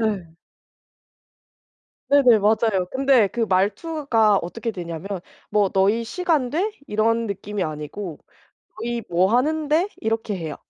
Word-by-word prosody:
예. 195 -7 -2 1.8
네네. 265 -5 +6
맞아요. 210 -2 +2
근데 265 -5 +4
그 235 - -3
말투가 220 - +2
어떻게 230 +7 -4
되냐면 170 -1 -6 0.4
뭐 205 -2 +2
"너희 200 +5 +2
시간 300 -1 0
돼?" 385 +8 0
이런 230 +1 +1
느낌이 200 -1 -4
아니고 155 +3 -6 0.6
"너희 235 0 -3
뭐 180 +4 +2
하는데?" 310 +6 +1
이렇게 220 -1 -1
해요. 160 -4 -5
220 Hz, 240 characters per minute, -22 LUFS, 195-250 Hz, 1.8 s, 네네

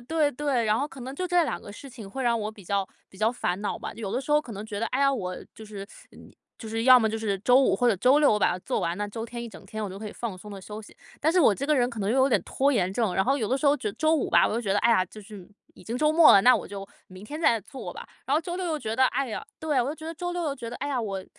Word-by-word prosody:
对 305 +3 +1
对， 265 -3 0
然 215 +1 +2
后 280 - -1
可 270 - -12
能 260 +2 -6
就 365 +4 -3
这 350 -1 +3
2 - - -3
个 205 - -10
事 275 +7 -11
情 230 -6 -10
会 265 +7 -5
让 235 -2 +2
我 210 0 -3
比 205 -4 -15
较 200 +1 -1 0.2
比 - - -18
较 215 +2 +2
烦 190 -6 -2
恼 205 - -3
吧， - - -6
有 210 -4 -5
的 260 - 0
时 275 - -8
候 300 - +5
可 250 -6 -10
能 205 +1 -7
觉 205 -2 -5
得， 230 - 0
哎 260 - -2
呀， 275 0 +4
我 185 -7 -3 0.2
就 220 - -11
是 205 -2 -8 0.7
就 225 - -8
是 225 +1 -2
要 255 -1 +9
么 220 - +1
就 220 +1 -3
是 205 -3 -2
周 245 +6 +4
5 270 - +3
或 245 - +2
者 220 - +2
周 255 +9 +4
6 295 -1 +5
我 210 - +2
把 - - +3
它 180 - -4
做 - - -2
完， 170 +1 -2
那 205 - -2
周 225 +2 -6
天 235 +1 -7
一 235 - -6
整 - - -13
天 220 0 -6
我 210 - -3
就 195 +1 -8
可 215 - -7
以 - - -7
放 230 -6 -5
松 210 +3 -11
地 200 -1 -8
休 210 +3 -8
息。 210 - -15 0.2
但 315 +3 +1
是 365 - +4
我 225 -10 +5
这 275 - -4
个 305 - +3
人 245 -3 +2
可 235 -3 -8
能 200 +1 0
又 255 - +2
有 265 +1 +4
点 255 - +2
拖 275 +2 +1
延 190 -7 +1
症， 220 -4 0
然 190 - +2
后 270 +3 +1
有 220 -5 -2
的 260 - +1
时 290 - -6
候 285 - +5
觉 215 -6 -3
周 315 0 +2
5 310 - 0
吧， - - +5
我 - - -2
就 230 - 0
觉 205 -5 -1
得， 205 - +2
哎 235 - +3
呀， 225 -5 +4
就 215 - -12
是 200 -2 -12 0.3
已 - - -16
经 230 - -4
周 305 +3 +2
末 330 -1 +8
了， 200 - +7
那 250 +4 +7
我 - - -3
就 195 0 -7 0.2
明 185 +1 -12
天 300 +8 -7
再 235 -8 +3
做 270 - -8
吧， - - -9 0.2
然 275 - +1
后 310 - +3
周 345 +2 -5
六 370 - -3
又 315 -2 -1
觉 220 -6 -4
得 260 +2 +4
哎 270 0 -1
呀 220 - -5
对， 300 -4 0
我 245 - -1
就 295 - -3
觉 315 0 -10
得 330 - -4
周 350 +2 -4
6 350 0 -3
又 290 -3 -1
觉 235 -4 -7
得， 240 - -7
哎 285 - -4
呀， 265 -3 -1
我 195 -4 -4
235 Hz, 360 characters per minute, -26 LUFS, 210-280 Hz, 0.7 s, 要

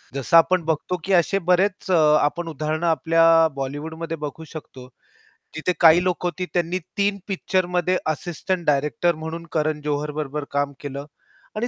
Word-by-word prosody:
जसं 140 +5 +3
आपण 180 +1 +4
बघतो, 160 +3 -1
की 195 - -1
असे 185 +3 +3
बरेच 190 +1 +1
अ, 180 - +5 0.3
आपण 165 +3 -1
उदाहरणे 155 +2 -3
आपल्या 165 0 +4
बॉलिवूडमध्ये 160 +4 -5
बघू 150 +2 -7
शकतो. 130 -5 -10 0.7
जिथे 170 +3 -1
काही 170 +1 +6
लोकं 180 -1 -1
होती 180 +2 -3
त्यांनी 175 +1 0 0.2
3 200 0 +1
पिक्चरमध्ये 185 -2 0
असिस्टंट 175 +3 -3
डायरेक्टर 150 +3 +1
म्हणून 160 +2 -6
करण 155 -1 -1
जोहर 150 0 -2
बरोबर 150 0 -4
काम 140 0 -1
केलं. 140 0 -6 0.5
आणि 230 +3 -1
165 Hz, 150 wpm, -22 LUFS, 150-180 Hz, 0.7 s, काही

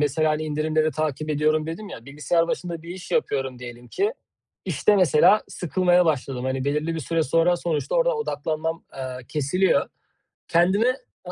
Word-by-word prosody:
mesela, 155 +2 +2
hani, 155 +1 -1
indirimleri 155 +1 0
takip 155 0 -2
ediyorum 155 +1 +1
dedim 200 +6 -6
ya 115 - -9
bilgisayar 165 +4 0
başında 170 -2 -3
bir 170 - -12
iş 180 +1 -8
yapıyorum 135 - -1
diyelim 120 0 -10
ki, 410 +4 0 0.5
işte, 210 - +2
mesela 185 +3 +5
sıkılmaya 180 0 +2
başladım, 135 -5 -1
hani, 130 0 -1
belirli 150 +3 -1
bir 160 - -3
süre 160 +4 0
sonra 165 +4 +3
sonuçta 165 - -2
oradan - - +2
odaklanmam, 160 - -3
aaa, 130 -1 -6
kesiliyor. 160 +6 +1 0.6
Kendimi 190 +7 +3 0.4
a - - -6
155 Hz, 160 wpm, -24 LUFS, 145-175 Hz, 0.6 s, mesela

